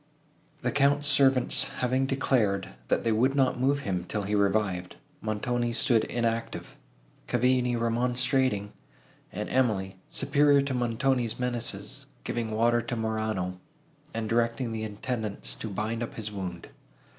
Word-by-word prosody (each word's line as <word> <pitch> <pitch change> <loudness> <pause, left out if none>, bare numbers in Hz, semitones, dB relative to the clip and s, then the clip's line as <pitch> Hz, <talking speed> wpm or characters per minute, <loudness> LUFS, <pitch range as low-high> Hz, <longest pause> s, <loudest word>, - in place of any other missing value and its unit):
The - - 0
Count's 145 +1 +3
servants 135 -3 +3
having 130 +1 +1
declared, 105 -8 +1 0.2
that - - +1
they 115 - +2
would 125 +5 +2
not 130 -3 +2
move 140 +3 +2
him 90 -8 -2
till 105 -2 -2
he 100 +2 -2
revived, 100 -3 +1 0.3
Montoni's 120 +2 -1
stood 115 -2 +3
inactive, 115 -1 -2 0.5
Cavigni 125 0 +2
remonstrating, 120 -2 +1 0.6
and - - -4
Emily, 100 -7 +1
superior 140 0 +3
to 140 -1 -2
Montoni's 120 0 0
menaces, 125 -2 -2 0.2
giving 115 -2 -2
water 120 +2 +2
to 120 +1 -4
Morano, 110 -5 -2 0.5
and 115 -1 -3
directing 115 +1 0
the 110 -1 -3
attendants 110 0 -3
to 110 - -6
bind 110 +3 -2
up 120 - -4
his 110 -1 -4
wound. 90 -4 -6
115 Hz, 135 wpm, -28 LUFS, 110-130 Hz, 0.6 s, Count's